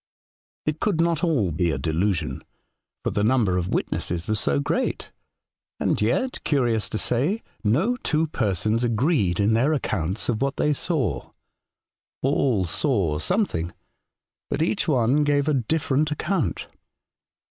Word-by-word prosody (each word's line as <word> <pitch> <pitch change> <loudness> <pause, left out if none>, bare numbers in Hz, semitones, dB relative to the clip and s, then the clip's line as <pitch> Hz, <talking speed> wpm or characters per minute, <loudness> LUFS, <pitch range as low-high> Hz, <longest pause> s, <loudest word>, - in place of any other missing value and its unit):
It 155 0 -1
could 195 -6 0
not 170 0 +1
all 135 - +2
be 85 +3 0
a - - -1
delusion, 85 +3 -1 0.6
for - - -1
the 105 - 0
number 110 -5 +3
of 90 +1 -3
witnesses 85 -1 -1
was 110 -1 0
so 70 0 +1
great, 70 - -2 0.7
and - - 0
yet, 250 - 0
curious 120 -7 +1
to - - -2
say, 145 - 0 0.2
no 160 - +2
two 160 -8 0
persons 110 - 0
agreed 115 - +1
in 105 +2 +3
their 130 +7 +3
accounts 100 - -2
of 120 -1 -1
what 140 0 0
they 150 - +2
saw; 140 - -1 0.9
all 130 -7 +2
saw 90 - 0
something, 90 - -1 0.7
but - - 0
each 185 +4 0
one 135 0 +3
gave 145 0 +2
a 155 - +3
different 145 +3 +1
account. 150 - -1
125 Hz, 140 wpm, -24 LUFS, 100-155 Hz, 0.9 s, number